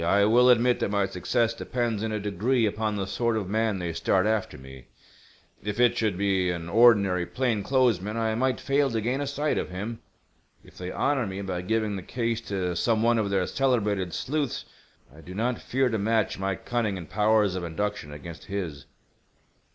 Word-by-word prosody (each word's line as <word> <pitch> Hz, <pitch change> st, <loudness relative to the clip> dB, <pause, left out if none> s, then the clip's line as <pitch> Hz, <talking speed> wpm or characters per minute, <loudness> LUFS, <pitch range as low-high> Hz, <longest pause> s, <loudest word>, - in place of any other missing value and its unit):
"I 100 Hz, +4 st, +4 dB
will 120 Hz, +4 st, +5 dB
admit 125 Hz, 0 st, +4 dB
that -, -, 0 dB
my 100 Hz, -1 st, +1 dB
success 115 Hz, +6 st, 0 dB
depends 115 Hz, -2 st, -2 dB
in 110 Hz, 0 st, -2 dB
a 110 Hz, -, -1 dB
degree 105 Hz, +5 st, +1 dB
upon 105 Hz, 0 st, -1 dB
the 100 Hz, -1 st, -2 dB
sort 115 Hz, +3 st, 0 dB
of 100 Hz, -4 st, -3 dB
man 110 Hz, 0 st, 0 dB
they 85 Hz, -2 st, -3 dB
start 95 Hz, +3 st, +1 dB
after 110 Hz, -2 st, -1 dB
me. 65 Hz, -1 st, -12 dB, 0.8 s
If 105 Hz, +2 st, -4 dB
it 120 Hz, -1 st, +4 dB
should 105 Hz, -5 st, 0 dB
be 95 Hz, -2 st, +1 dB
an 85 Hz, -2 st, -3 dB
ordinary 100 Hz, -5 st, +4 dB
plain 125 Hz, -5 st, 0 dB
clothes 125 Hz, -4 st, +2 dB
man 105 Hz, +3 st, -4 dB
I 110 Hz, -1 st, 0 dB
might 130 Hz, +3 st, 0 dB
fail 140 Hz, 0 st, +1 dB
to 115 Hz, -2 st, -1 dB
gain 125 Hz, +6 st, -1 dB
a 145 Hz, -, -2 dB
sight 145 Hz, +2 st, 0 dB
of -, -, -4 dB
him. 105 Hz, +5 st, -5 dB, 0.6 s
If -, -, -18 dB
they 90 Hz, 0 st, -6 dB
honor 135 Hz, +2 st, 0 dB
me 95 Hz, +1 st, -5 dB
by 90 Hz, -2 st, -3 dB
giving 110 Hz, +1 st, -1 dB
the -, -, -5 dB
case 115 Hz, +3 st, -2 dB
to 90 Hz, -3 st, -1 dB
some 110 Hz, +4 st, +1 dB
one 120 Hz, 0 st, +3 dB
of 105 Hz, -2 st, 0 dB
their 95 Hz, -2 st, +1 dB
celebrated 105 Hz, -9 st, 0 dB
sleuths 145 Hz, -, -2 dB, 0.5 s
I 80 Hz, -, -13 dB
do 90 Hz, +4 st, -10 dB
not 120 Hz, +3 st, -1 dB
fear 130 Hz, +1 st, +1 dB
to 110 Hz, -2 st, -1 dB
match 110 Hz, -1 st, 0 dB
my 95 Hz, 0 st, -1 dB
cunning 110 Hz, -2 st, -2 dB
and 85 Hz, -3 st, -8 dB
powers 105 Hz, 0 st, +2 dB
of 90 Hz, -1 st, -4 dB
induction 85 Hz, -2 st, -3 dB
against 80 Hz, +2 st, -9 dB
his." 90 Hz, -9 st, -5 dB
105 Hz, 200 wpm, -26 LUFS, 95-115 Hz, 0.8 s, will